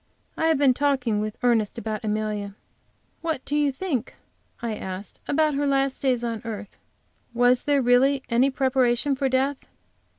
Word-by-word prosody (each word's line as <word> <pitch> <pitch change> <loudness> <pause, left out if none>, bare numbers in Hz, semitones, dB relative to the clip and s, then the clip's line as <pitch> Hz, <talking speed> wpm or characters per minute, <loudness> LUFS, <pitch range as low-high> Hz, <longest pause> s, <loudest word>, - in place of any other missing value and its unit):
I 320 - +1
have 320 -2 +3
been 275 -2 +4
talking 255 -6 +1
with 215 0 -4
Ernest 230 -4 +2
about 215 0 -4
Amelia. 210 -2 -2 0.7
"What 320 -5 -3
do 290 - -2
you 295 -1 +2
think," 270 - -3 0.4
I 235 -2 -3
asked, 190 -1 -7
"about 305 +1 +2
her 285 +1 0
last 275 -1 +1
days 255 -3 +1
on 230 -2 -3
earth? 210 -3 -7 0.6
Was 245 +1 +4
there 285 -2 +2
really 260 +3 +3
any 245 +3 +3
preparation 260 0 +1
for 270 0 0
death?" 265 +2 +1
255 Hz, 160 wpm, -24 LUFS, 225-280 Hz, 0.7 s, been